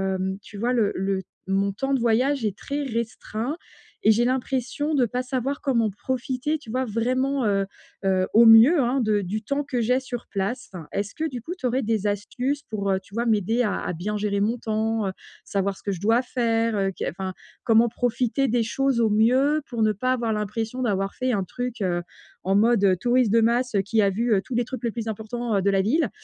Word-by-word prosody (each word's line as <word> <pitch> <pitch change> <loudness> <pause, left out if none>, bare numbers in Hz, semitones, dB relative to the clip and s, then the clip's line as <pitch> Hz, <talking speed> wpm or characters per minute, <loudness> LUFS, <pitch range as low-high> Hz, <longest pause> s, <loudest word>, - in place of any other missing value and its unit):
hem 190 +1 -2
tu 205 - -12
vois 240 +4 0
le 220 -4 +2
le 190 0 -1 0.3
mon 195 +1 +1
temps 270 +6 -2
de 270 - +2
voyage 240 +3 +2
est 200 -2 -1
très 285 +5 -4
restreint 235 +2 -3 0.5
et 220 - +6
j'ai 230 +2 +3
l'impression 265 +3 -1
de 255 -4 +4
pas 245 +3 -2
savoir 265 +2 -2
comment 235 -6 +1
profiter, 260 +6 -2
tu 260 - -14
vois, 260 +2 0
vraiment 255 +4 0
heu 195 -2 +2 0.4
heu 185 -1 +2
au 230 +2 +7
mieux 230 +9 +8
hein 255 +1 +1
de 215 -2 +2
du 205 +4 -4
temps 280 +6 -1
que 260 -4 -2
j'ai 250 +3 +2
sur 245 -2 -7
place. 215 +5 -3
Enfin, 170 -5 -8
est-ce 200 0 -3
que, 320 - -2
du 250 -5 -6
coup, 330 +9 -5
tu 260 - -6
aurais 255 +2 0
des 215 -2 0
astuces 250 +8 -2
pour 200 -2 -2
heu, 190 - +1
tu 195 - -21
vois, 235 +2 -1
m'aider 225 +1 +2
à 205 -4 -1
à - - -3
bien 200 +6 -3
gérer 205 -1 -1
mon 220 +4 +1
temps? 220 -1 -1
Heu - - -1 0.3
savoir 195 0 -1
ce - - -18
que 200 - -1
je 185 - -4
dois 225 +5 +3
faire, 230 -3 0
heu 195 -1 +1
qu'est - - -2
enfin, 190 +1 -5 0.3
comment 230 0 +4
profiter 245 +3 0
des 235 +1 +1
choses 265 +2 0
au 225 - +3
mieux, 255 +8 +3
pour 235 -2 -3
ne 215 - +4
pas 255 +6 0
avoir 235 -3 -1
l'impression 225 +4 -3
d'avoir 195 -4 0
fait 255 0 -1
un 200 -5 0
truc, 245 +5 -5
heu, 175 -2 0 0.4
en 195 +1 +1
mode 200 -4 +4
touriste 245 0 +2
de 230 - +5
masse 235 +1 +1
heu 200 - +4
qui 215 +3 +1
a 200 - +4
vu 230 +4 +1
heu 195 - +3
tous 260 - -6
les 240 - +2
trucs 255 -1 -7
les 235 - 0
plus 225 0 -5
importants 220 +1 -3
heu - - +1
de 200 - +2
la 195 0 +3
ville? 265 - +1
230 Hz, 230 wpm, -24 LUFS, 205-255 Hz, 0.5 s, mieux